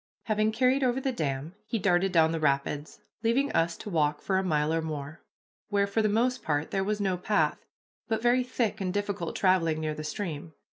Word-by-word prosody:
Having 215 -1 +1
carried 255 +4 +3
over 250 0 +2
the 265 0 -1
dam, 150 - -3
he 230 - -1
darted 190 -1 +2
down 160 -2 +4
the 165 - -1
rapids, 145 0 -1 0.2
leaving 250 +5 +2
us 165 +1 +1
to - - -7
walk 150 -3 +1
for 190 -1 0
a - - -1
mile 155 -3 +1
or 165 - +1
more, 155 0 -6 0.5
where 200 -1 +2
for 200 +3 0
the 215 - +2
most 250 +4 +1
part 150 -1 -1
there 195 -1 0
was 210 +1 -1
no 190 -3 0
path, 205 +4 +1 0.5
but 220 -2 0
very 245 +2 +3
thick 235 -4 -2
and 185 -1 -1
difficult 200 -3 -2
traveling 170 -5 +2
near 155 -1 -2
the 155 0 -6
stream. 160 -2 -5
190 Hz, 205 wpm, -28 LUFS, 155-220 Hz, 0.5 s, down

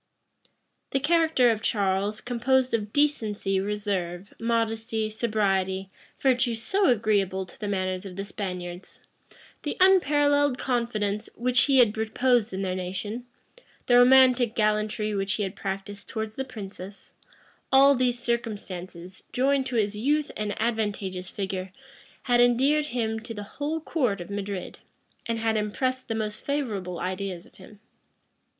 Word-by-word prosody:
The 270 - 0
character 315 -4 +3
of 220 -1 -2
Charles, 200 0 0
composed 250 +1 +1
of 210 -2 -1
decency, 215 -9 +1
reserve, 200 -2 -3
modesty, 225 -1 -1
sobriety, 195 -4 0 0.3
virtues 245 -3 +2
so 390 - +2
agreeable 200 -5 +1
to 185 - -14
the 210 - -4
manners 185 -2 -1
of 190 -3 -8
the 195 +1 -4
Spaniards; 180 -3 -6 0.6
the - - -4
unparalleled 290 -7 +4
confidence 220 -5 -1
which 250 +1 +3
he 275 -2 +3
had 235 -4 +5
reposed 235 +1 +2
in 190 +1 -3
their 185 -1 -1
nation; 190 +6 -5 0.6
the 245 - +2
romantic 250 -2 +6
gallantry 215 0 0
which 195 0 0
he 210 - -1
had 190 -1 -4
practised 195 +1 -5
towards 220 -1 -4
the 265 - -3
princess; 200 -4 -9 0.6
all 275 +1 +7
these 250 -2 +1
circumstances, 195 -7 -4
joined 265 +1 +2
to 250 - -4
his 210 -2 +1
youth 290 +7 0
and 210 -1 -3
advantageous 205 -5 -2
figure, 190 -2 -4 0.5
had 245 -1 +3
endeared 270 +5 +3
him 225 -4 -2
to 225 0 -7
the 205 - -5 0.2
whole 310 +3 -1
court 255 - -1
of 175 +3 -8
Madrid, 200 -2 -5 0.5
and 230 0 -1
had 225 0 0
impressed 255 +5 -1
the 225 - -2
most 215 -1 -3
favorable 210 -12 -3
ideas 185 -1 -4
of - - -21
him. 200 +2 -15
220 Hz, 140 wpm, -26 LUFS, 195-250 Hz, 0.6 s, all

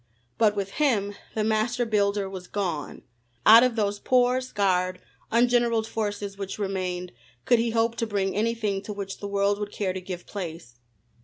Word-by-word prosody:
But 210 -2 +4
with 195 -1 -3
him 205 -8 +2 0.2
the 215 - +1
master 220 +3 +1
builder 205 -2 +1
was 190 -1 -8
gone. 175 -8 -3 0.4
Out 225 +2 +10
of 250 -2 +2
those 205 -2 0
poor, 250 +1 +3
scarred, 185 -6 0 0.3
ungeneraled 235 -1 +3
forces 205 -2 -4
which 195 -1 -4
remained, 185 -3 -3 0.3
could 240 - +4
he 230 +1 +1
hope 230 +1 +1
to 230 - -1
bring 195 -3 -1
anything 215 -2 0
to 210 - -6
which 200 -1 -6
the 200 - -5
world 200 0 +1
would 205 -1 -4
care 190 -3 -2
to 185 - -5
give 180 -1 -7
place? 165 - -7
205 Hz, 170 wpm, -26 LUFS, 195-225 Hz, 0.4 s, Out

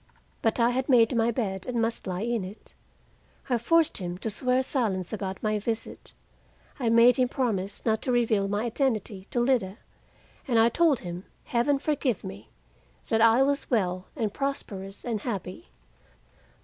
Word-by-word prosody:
But 225 +2 +1
I 235 +1 +4
had 260 +2 -2
made 240 -2 +5
my 230 0 +3
bed 195 -6 -3
and 245 -2 -1
must 225 -2 -1
lie 185 0 -3
in 235 -3 -1
it. 190 +4 -10 0.8
I 245 - +3
forced 330 +7 +3
him 175 -1 -4
to 220 +4 -3
swear 255 +4 +1
silence 210 - -1
about 190 -2 -4
my 215 -1 +1
visit; 225 +2 -5 0.7
I 240 -4 +1
made 230 +2 +6
him 250 -1 +2
promise 215 -8 -2
not 220 -1 +1
to 255 - -1
reveal 225 -5 +2
my 205 +2 -1
identity 220 -6 -1
to 240 - -2
Lida; 240 -6 +1 0.7
and 240 -3 +2
I 225 +1 +6
told 300 -1 +2
him 175 +1 -7 0.2
Heaven 250 +4 +1
forgive 275 -6 -1
me! 100 +4 -9 0.6
that 225 - +2
I 230 +3 +6
was 280 +1 0
well 185 -6 0
and 220 -7 -2
prosperous 200 -8 -5
and 225 -4 -2
happy. 200 - -5
230 Hz, 165 wpm, -27 LUFS, 195-250 Hz, 0.8 s, made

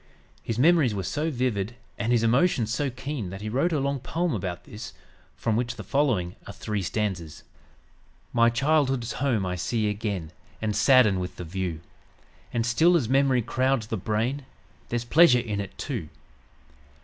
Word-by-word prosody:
His 115 - -3
memories 145 -5 +4
were 95 - -2
so 150 - -1
vivid 120 -6 -1 0.2
and 110 +3 -1
his 120 -2 +3
emotions 115 -2 +2
so 140 +4 0
keen 130 -4 -5
that 95 +2 -7
he 110 - -4
wrote 135 +10 +1
a 155 - +1
long 140 0 -1
poem 165 +6 -1
about 90 -2 -4
this, 110 +2 -9 0.4
from 115 -2 -1
which 120 +1 -1
the - - -7
following 120 -12 0
are - - -7
three 105 -2 -3
stanzas: 90 -4 -3 0.9
"My 115 0 +5
childhood's 135 -1 +1
home 120 -8 0
I 90 0 -2
see 110 +4 -1
again 100 -6 -3 0.3
And 105 -2 -1
sadden 105 -3 +5
with 90 0 -5
the - - -6
view; 85 -2 -4 0.7
And 115 -1 0
still, 160 +9 +4
as 130 -9 -1
memory 135 -2 +3
crowds 130 0 +1
the 110 - -3
brain, 115 +8 -1 0.5
There's 120 0 -2
pleasure 150 0 +6
in 110 -4 -2
it, 100 - -8
too. - - -4
115 Hz, 170 wpm, -26 LUFS, 105-135 Hz, 0.9 s, pleasure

